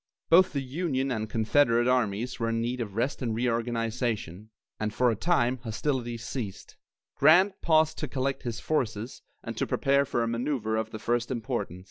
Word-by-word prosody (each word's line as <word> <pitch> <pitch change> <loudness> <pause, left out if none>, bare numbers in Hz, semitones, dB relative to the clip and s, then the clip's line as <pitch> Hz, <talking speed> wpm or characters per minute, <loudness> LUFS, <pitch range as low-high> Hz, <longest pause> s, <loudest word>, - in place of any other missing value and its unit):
Both 180 +1 +6
the 140 -2 -1
Union 135 -1 -1
and 110 -3 -2
Confederate 120 +2 +3
armies 120 -1 0
were 115 -1 0
in 115 0 0
need 120 +2 -2
of 105 -4 -5
rest 125 +6 -1
and 115 -3 -1
reorganization, 115 -4 -2 0.3
and 110 0 -1
for 125 +2 +2
a - - -1
time 130 - +1
hostilities 120 0 -3
ceased. 115 -7 -6 0.4
Grant 180 +7 +5
paused 160 -1 +3
to 155 - -2
collect 135 +1 -2
his 120 -2 -4
forces 115 -6 -2 0.2
and - - -5
to - - -1
prepare 140 0 +2
for 120 -3 0
a - - -1
manoeuvre 115 -1 -1
of 110 0 -1
the 110 - -6
first 120 +2 -1
importance. 120 -7 -3
120 Hz, 175 wpm, -28 LUFS, 115-135 Hz, 0.4 s, Both